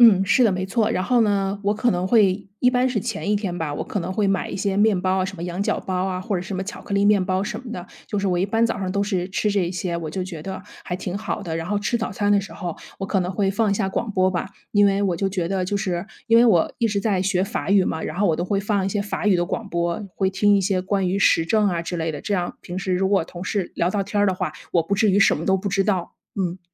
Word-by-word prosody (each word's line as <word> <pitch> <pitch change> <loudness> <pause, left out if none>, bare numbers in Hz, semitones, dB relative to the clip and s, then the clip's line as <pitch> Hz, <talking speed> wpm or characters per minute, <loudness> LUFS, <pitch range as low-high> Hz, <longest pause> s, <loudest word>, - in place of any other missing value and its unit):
嗯， 205 -5 +7
是 250 +6 +4
的， 220 - +4
没 185 0 -2
错。 215 +3 +1
然 185 - 0
后 240 +5 +2
呢， 200 -2 0
我 205 +1 +2
可 240 +3 +1
能 180 +1 0
会 200 -3 +3
一 250 - +5
般 250 0 +2
是 240 -4 -1
前 210 -1 -2
一 - - +3
天 195 -4 -2
吧， 150 -3 -2
我 - - -3
可 210 - -3
能 185 +1 -3
会 205 0 +1
买 195 - 0
一 - - -5
些 195 0 -1
面 205 -2 +3
包 185 0 +1
啊， - - 0
什 195 +1 -5
么 165 - -7
羊 175 +1 -4
角 200 - 0
包 190 - -5
啊， 185 -1 -2
或 200 +1 -2
者 175 - -3
什 190 +2 -5
么 190 - -2
巧 200 - -7
克 200 - -4
力 200 0 +3
面 205 -2 +4
包 190 0 0
什 210 +1 -4
么 245 -3 -8
的， 180 -5 -5 0.2
就 210 - -4
是 200 -1 0
我 180 -1 +1
一 185 - +1
般 225 +3 +2
早 230 - 0
上 185 -2 -2
都 200 +1 +1
是 185 -3 -1
吃 205 +2 0
这 200 -3 +1
一 175 - -4
些， 180 -2 -2
我 165 -2 -4
就 185 +5 -3
觉 180 -4 -6
得 190 +3 -6 0.2
还 180 - -3
挺 185 +1 -4
好 215 - -3
的。 165 -4 -3
然 165 - -4
后 205 - 0
吃 225 +3 0
早 220 -3 -3
餐 205 +1 0
的 205 -1 +5
时 195 - -9
候 175 -4 -5 0.2
我 - - -1
可 195 - +1
能 180 0 -1
会 195 0 +1
放 215 +2 +1
一 200 - +2
下 195 -1 0
广 225 +4 -2
播 185 0 +3
吧， 180 0 -2 0.2
因 205 -1 +5
为 200 0 +2
我 185 -4 +1
就 195 +3 0
觉 180 -3 -2
得 190 -1 0
就 200 +3 -1
是， 185 -2 -2 0.2
因 230 0 +6
为 240 - +6
我 180 -8 +3
一 235 - +2
直 205 -2 0
在 200 -3 +1
学 185 -1 +1
法 195 0 -3
语 195 -2 +5
嘛， 160 - -2
然 - - -5
后 205 +2 +2
我 160 - +2
都 175 - -1
会 195 +2 0
放 200 -1 0
一 - - +1
些 200 +1 -1
法 205 +1 -3
语 205 - +5
的 175 -1 +2
广 210 +4 -4
播， 170 0 -1
会 190 -1 +1
听 205 +2 +3
一 - - +2
些 190 -1 +1
关 190 0 0
于 195 +2 0
时 165 -3 +4
政 210 +3 +2
啊 170 -2 -1
之 175 +1 -4
类 160 -1 -2
的， 150 - -6
这 205 - -1
样 175 -2 -2
平 180 +1 -6
时 185 -1 -1
如 190 +1 +1
果 195 -4 +2
同 175 +1 -9
事 190 -1 -2
聊 175 - +1
到 200 0 -1
天 205 +1 -1
儿 205 - +4
的 - - +2
话， 180 -4 -3 0.2
我 170 - +3
不 165 +5 -1
至 205 +1 +3
于 195 - +3
什 200 - +5
么 - - -5
都 190 - +3
不 195 +2 -3
知 195 +1 +2
道， 190 -4 -1 0.2
嗯。 185 -2 -1
195 Hz, 345 characters per minute, -23 LUFS, 180-205 Hz, 0.2 s, 嗯